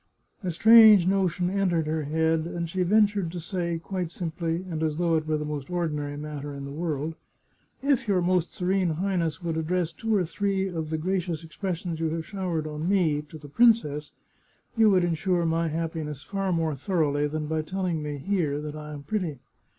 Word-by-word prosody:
A 185 Hz, -, -3 dB
strange 215 Hz, +1 st, +8 dB
no 190 Hz, 0 st, +3 dB
tion 180 Hz, +1 st, -1 dB
entered 180 Hz, -5 st, +1 dB
her 155 Hz, +1 st, -1 dB
head, 160 Hz, +2 st, +1 dB
and 170 Hz, 0 st, -3 dB
she 185 Hz, +3 st, -2 dB
ventured 200 Hz, -2 st, +3 dB
to 175 Hz, -, -4 dB
say, 170 Hz, -1 st, -2 dB
quite 180 Hz, 0 st, -4 dB
simply, 165 Hz, +1 st, -3 dB
and 160 Hz, -3 st, -4 dB
as 155 Hz, -1 st, 0 dB
though 170 Hz, -1 st, +1 dB
it 155 Hz, -1 st, -1 dB
were 155 Hz, -1 st, +1 dB
the 150 Hz, -, -3 dB
most 150 Hz, -1 st, -5 dB
ordinary 150 Hz, -5 st, -2 dB
matter 145 Hz, -1 st, -6 dB
in 140 Hz, 0 st, -6 dB
the 140 Hz, -, -7 dB
world: 155 Hz, 0 st, -2 dB, 0.4 s
" -, -, -38 dB
If 265 Hz, -2 st, -2 dB
your 195 Hz, -3 st, +3 dB
Most 180 Hz, -1 st, +1 dB
Serene 180 Hz, -2 st, 0 dB
Highness 175 Hz, -2 st, -1 dB
would 165 Hz, -2 st, -2 dB
address 170 Hz, +1 st, -1 dB
two 225 Hz, +5 st, -1 dB
or 185 Hz, -3 st, +2 dB
three 195 Hz, +2 st, -1 dB
of 165 Hz, -4 st, -4 dB
the 160 Hz, -, -1 dB
gracious 175 Hz, -1 st, -2 dB
expressions 170 Hz, 0 st, -4 dB
you 165 Hz, -1 st, 0 dB
have 160 Hz, 0 st, -3 dB
showered 180 Hz, -4 st, -3 dB
on 155 Hz, +3 st, -3 dB
me 165 Hz, -7 st, +2 dB
to 155 Hz, -, -9 dB
the 150 Hz, -1 st, -11 dB
princess, 150 Hz, -6 st, +3 dB, 0.6 s
you 225 Hz, -2 st, +5 dB
would 185 Hz, -3 st, +4 dB
ensure 175 Hz, +1 st, +1 dB
my 165 Hz, 0 st, +1 dB
happiness 155 Hz, -3 st, -4 dB
far 195 Hz, +4 st, -2 dB
more 165 Hz, -2 st, 0 dB
thoroughly 145 Hz, -1 st, 0 dB
than 155 Hz, +1 st, -3 dB
by 160 Hz, +1 st, -1 dB
telling 175 Hz, 0 st, -2 dB
me, 150 Hz, -1 st, -4 dB
here, 150 Hz, -2 st, -1 dB
that 150 Hz, 0 st, -6 dB
I 150 Hz, 0 st, -7 dB
am 145 Hz, -1 st, -8 dB
pretty. 180 Hz, -6 st, -2 dB
165 Hz, 200 wpm, -26 LUFS, 155-185 Hz, 0.6 s, strange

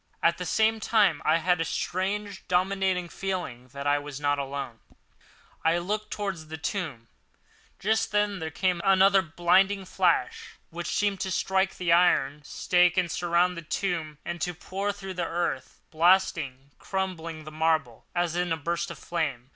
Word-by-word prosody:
At -, -, +3 dB
the -, -, -3 dB
same 220 Hz, 0 st, +2 dB
time 215 Hz, -1 st, +3 dB
I -, -, +4 dB
had 180 Hz, +1 st, +1 dB
a -, -, +3 dB
strange, 195 Hz, +4 st, -2 dB
dominating 185 Hz, 0 st, +1 dB
feeling 175 Hz, -11 st, -4 dB
that 140 Hz, +3 st, -8 dB
I 145 Hz, 0 st, +3 dB
was 145 Hz, -1 st, -7 dB
not 145 Hz, -1 st, +1 dB
alone. 135 Hz, -4 st, -5 dB, 0.8 s
I 165 Hz, +1 st, +3 dB
looked 210 Hz, +5 st, -3 dB
towards 195 Hz, -7 st, -4 dB
the 160 Hz, +1 st, -6 dB
tomb. 155 Hz, -, -4 dB, 0.7 s
Just 220 Hz, +3 st, 0 dB
then 205 Hz, -1 st, +1 dB
there 160 Hz, -1 st, -3 dB
came 180 Hz, +2 st, 0 dB
another 195 Hz, 0 st, +5 dB
blinding 190 Hz, +3 st, +2 dB
flash, -, -, 0 dB, 0.2 s
which -, -, -5 dB
seemed 205 Hz, -2 st, 0 dB
to 190 Hz, -, -2 dB
strike 190 Hz, +1 st, 0 dB
the 175 Hz, -2 st, 0 dB
iron 150 Hz, -5 st, +3 dB
stake 180 Hz, +3 st, +2 dB
that 180 Hz, -3 st, +1 dB
surmounted 175 Hz, +1 st, +1 dB
the -, -, -31 dB
tomb 165 Hz, -6 st, -2 dB
and 175 Hz, 0 st, -4 dB
to 180 Hz, -1 st, -2 dB
pour 195 Hz, +4 st, -3 dB
through 195 Hz, -1 st, -8 dB
to -, -, -17 dB
the 170 Hz, -2 st, -1 dB
earth, 165 Hz, -6 st, -3 dB
blasting 165 Hz, -5 st, +3 dB
and -, -, -38 dB
crumbling 170 Hz, -5 st, -4 dB
the 155 Hz, -, -9 dB
marble, 155 Hz, -6 st, 0 dB
as 175 Hz, -1 st, 0 dB
in 175 Hz, -1 st, 0 dB
a 165 Hz, -, +1 dB
burst 170 Hz, +2 st, -2 dB
of -, -, -7 dB
flame. 140 Hz, -8 st, -3 dB
175 Hz, 170 wpm, -27 LUFS, 155-190 Hz, 0.8 s, another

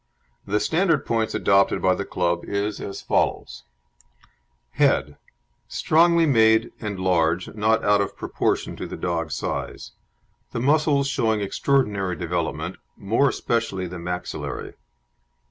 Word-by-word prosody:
The 105 Hz, +1 st, +1 dB
standard 160 Hz, -, +2 dB
of -, -, -22 dB
points 115 Hz, -1 st, -1 dB
adopted 100 Hz, 0 st, +3 dB
by 95 Hz, -, +3 dB
the 100 Hz, -, -3 dB
club 85 Hz, -1 st, -1 dB
is 100 Hz, +1 st, -2 dB
as 100 Hz, -, -6 dB
follows: -, -, -1 dB, 1.1 s
HEAD 70 Hz, +4 st, +2 dB, 0.5 s
Strongly 170 Hz, +1 st, +3 dB
made 110 Hz, -5 st, +4 dB
and 105 Hz, -3 st, -4 dB
large, 90 Hz, -1 st, +1 dB
not 110 Hz, +1 st, +1 dB
out 105 Hz, 0 st, +4 dB
of 100 Hz, -, -4 dB
proportion -, -, -1 dB
to -, -, -5 dB
the -, -, -7 dB
dog's 85 Hz, -3 st, -2 dB
size; -, -, -4 dB, 0.6 s
the -, -, -2 dB
muscles 145 Hz, +1 st, +2 dB
showing 110 Hz, -5 st, 0 dB
extraordinary 100 Hz, -4 st, 0 dB
development, 85 Hz, -1 st, -3 dB, 0.2 s
more 115 Hz, +8 st, +2 dB
especially 110 Hz, -7 st, -2 dB
the 90 Hz, 0 st, -7 dB
maxillary. 90 Hz, +1 st, -5 dB
100 Hz, 130 wpm, -23 LUFS, 90-115 Hz, 1.1 s, made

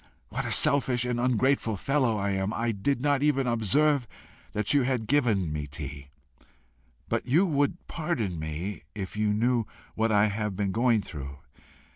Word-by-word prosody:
What -, -, -3 dB
a -, -, -3 dB
selfish 130 Hz, -4 st, +2 dB
and 125 Hz, -1 st, -1 dB
ungrateful 125 Hz, -2 st, +1 dB
fellow 130 Hz, -1 st, +1 dB
I 100 Hz, 0 st, -1 dB
am! 95 Hz, +1 st, -1 dB
I 115 Hz, +1 st, 0 dB
did 120 Hz, +6 st, -1 dB
not 145 Hz, -1 st, +2 dB
even 145 Hz, -2 st, +2 dB
observe 125 Hz, +4 st, +2 dB, 0.4 s
that 105 Hz, +4 st, 0 dB
you 145 Hz, -, +4 dB
had 125 Hz, -3 st, 0 dB
given 110 Hz, -, +1 dB
me 75 Hz, -1 st, -3 dB
tea! 70 Hz, -1 st, -7 dB, 1.0 s
But -, -, -2 dB
you 160 Hz, +10 st, +4 dB
would 145 Hz, 0 st, 0 dB
pardon 120 Hz, -, -2 dB
me 80 Hz, +6 st, -4 dB
if 95 Hz, -2 st, -5 dB
you 105 Hz, 0 st, +1 dB
knew 115 Hz, +1 st, +1 dB, 0.3 s
what 110 Hz, 0 st, +1 dB
I 105 Hz, 0 st, +5 dB
have 105 Hz, -1 st, -2 dB
been 100 Hz, 0 st, -1 dB
going 115 Hz, +1 st, +3 dB
through. 70 Hz, -3 st, -7 dB
115 Hz, 165 wpm, -27 LUFS, 100-135 Hz, 1.0 s, I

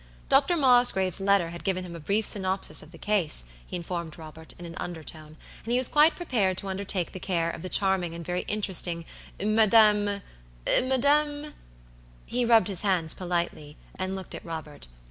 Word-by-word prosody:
Dr. 285 Hz, +6 st, +3 dB
Mosgrave's 245 Hz, -, +4 dB
letter 195 Hz, -4 st, +2 dB
had 170 Hz, -, -9 dB
given 185 Hz, -2 st, -1 dB
him 170 Hz, -1 st, -9 dB
a -, -, -8 dB
brief 200 Hz, +7 st, -1 dB
synopsis 190 Hz, -1 st, +3 dB
of 155 Hz, -, -12 dB
the 165 Hz, -, -13 dB
case, 185 Hz, -, 0 dB, 0.2 s
he -, -, -6 dB
informed 170 Hz, -2 st, -5 dB
Robert, 160 Hz, 0 st, -10 dB
in 175 Hz, -, -10 dB
an 170 Hz, -, -9 dB
undertone, 155 Hz, -2 st, -8 dB, 0.3 s
and 230 Hz, -, -5 dB
he 245 Hz, -, +3 dB
was 255 Hz, -1 st, +5 dB
quite 305 Hz, +2 st, +4 dB
prepared 215 Hz, -, -1 dB
to 195 Hz, -, -3 dB
undertake 190 Hz, -2 st, -2 dB
the 185 Hz, -, -8 dB
care 170 Hz, -3 st, -1 dB
of -, -, -9 dB
the 185 Hz, -, -6 dB
charming 190 Hz, -4 st, +1 dB
and 170 Hz, 0 st, -8 dB
very 180 Hz, 0 st, -2 dB
interesting 180 Hz, -5 st, +1 dB, 0.3 s
"MadamMadam" 215 Hz, -, +1 dB, 0.7 s
He 245 Hz, 0 st, -1 dB
rubbed 230 Hz, -5 st, +4 dB
his 195 Hz, -4 st, -1 dB
hands 180 Hz, -6 st, 0 dB
politely, 170 Hz, -4 st, -4 dB, 0.2 s
and 185 Hz, +1 st, -3 dB
looked 190 Hz, -1 st, -8 dB
at -, -, -8 dB
Robert. 155 Hz, -, -8 dB
190 Hz, 170 wpm, -26 LUFS, 170-215 Hz, 0.7 s, was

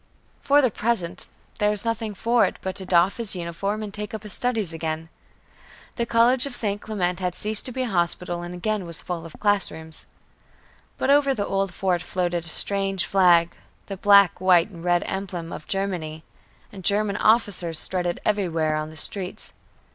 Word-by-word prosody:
For 285 Hz, +1 st, +4 dB
the 250 Hz, -, +3 dB
present, 190 Hz, -7 st, -2 dB, 0.3 s
there 210 Hz, -, +3 dB
was 210 Hz, +1 st, 0 dB
nothing 225 Hz, -2 st, -2 dB
for 235 Hz, +4 st, +2 dB
it, -, -, -4 dB
but 190 Hz, 0 st, -3 dB
to 190 Hz, -2 st, -6 dB
doff 180 Hz, +2 st, +3 dB
his 230 Hz, -5 st, +1 dB
uniform 190 Hz, +5 st, -3 dB
and 205 Hz, -2 st, -7 dB
take 210 Hz, +1 st, -5 dB
up 215 Hz, -, -8 dB
his 210 Hz, -3 st, -3 dB
studies 225 Hz, -8 st, -1 dB
again. 160 Hz, 0 st, -4 dB, 0.9 s
The 235 Hz, -1 st, -2 dB
college 240 Hz, +3 st, +3 dB
of 265 Hz, -, -6 dB
St. 205 Hz, -3 st, -2 dB
Clement 180 Hz, -4 st, -2 dB
had 180 Hz, -1 st, -2 dB
ceased 215 Hz, +2 st, +3 dB
to -, -, -5 dB
be 260 Hz, +1 st, -2 dB
a -, -, -2 dB
hospital 175 Hz, -2 st, -1 dB
and 175 Hz, 0 st, -7 dB
was -, -, -7 dB
again 200 Hz, -2 st, -2 dB
full 165 Hz, +1 st, -4 dB
of 160 Hz, -, -15 dB
classrooms. 160 Hz, -6 st, -1 dB, 0.9 s
But -, -, +1 dB
over 280 Hz, -1 st, +4 dB
the 205 Hz, -, -2 dB
old 195 Hz, -1 st, -1 dB
fort 180 Hz, -1 st, 0 dB
floated 175 Hz, -1 st, -2 dB
a -, -, -4 dB
strange 195 Hz, +2 st, 0 dB
flag 175 Hz, -3 st, +4 dB, 0.3 s
the 195 Hz, -, -6 dB
black, 200 Hz, -2 st, +5 dB
white 185 Hz, +1 st, +4 dB
and 170 Hz, -3 st, -11 dB
red 175 Hz, -1 st, +2 dB
emblem 180 Hz, -4 st, -5 dB
of 155 Hz, -, -9 dB
Germany, 175 Hz, -5 st, -3 dB, 0.5 s
and 195 Hz, -2 st, -10 dB
German 205 Hz, +1 st, +3 dB
officers 205 Hz, -7 st, +2 dB
strutted 175 Hz, -1 st, 0 dB
everywhere 165 Hz, -7 st, 0 dB
on 155 Hz, 0 st, -4 dB
the 155 Hz, -, -12 dB
streets. 185 Hz, +3 st, -2 dB
190 Hz, 185 wpm, -24 LUFS, 175-210 Hz, 0.9 s, black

